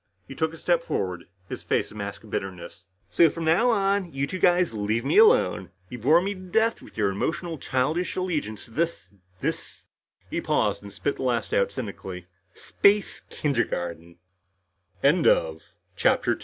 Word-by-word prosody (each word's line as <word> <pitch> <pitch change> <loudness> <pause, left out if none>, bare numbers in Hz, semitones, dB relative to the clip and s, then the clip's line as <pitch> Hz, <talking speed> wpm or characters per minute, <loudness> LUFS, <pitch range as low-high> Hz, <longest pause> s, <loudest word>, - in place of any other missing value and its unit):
He - - -8
took 160 +3 -1
a 165 - -10
step 170 0 +1
forward, 90 - -3 0.2
his - - -6
face - - -1
a - - -13
mask 100 0 -6
of 110 - -14
bitterness. 90 -1 -6 0.3
"So 165 - +5
from 165 +2 -5
now 175 +10 +4
on, 200 -4 +1
you 135 -1 -1
two 185 +6 -5
guys 175 -5 +3
leave 110 +2 -1
me 405 - +4
alone. 445 +2 +4 0.2
You 125 - -7
bore 155 +10 +4
me 200 +1 -1
to 185 - -12
death 220 +5 0
with - - -15
your 100 -3 +2
emotional 160 - -3
childish 150 +9 -1
allegiance 155 - -3
to - - -18
this 160 - -2 0.3
this" - - -4 0.5
he - - -1
paused 105 -2 0
and 100 0 -10
spit 100 +8 -2
the - - -6
last 120 -3 -1
out 100 0 +2
cynically 95 -5 -6 0.3
"space 200 0 +2
145 Hz, 155 wpm, -25 LUFS, -, 0.5 s, So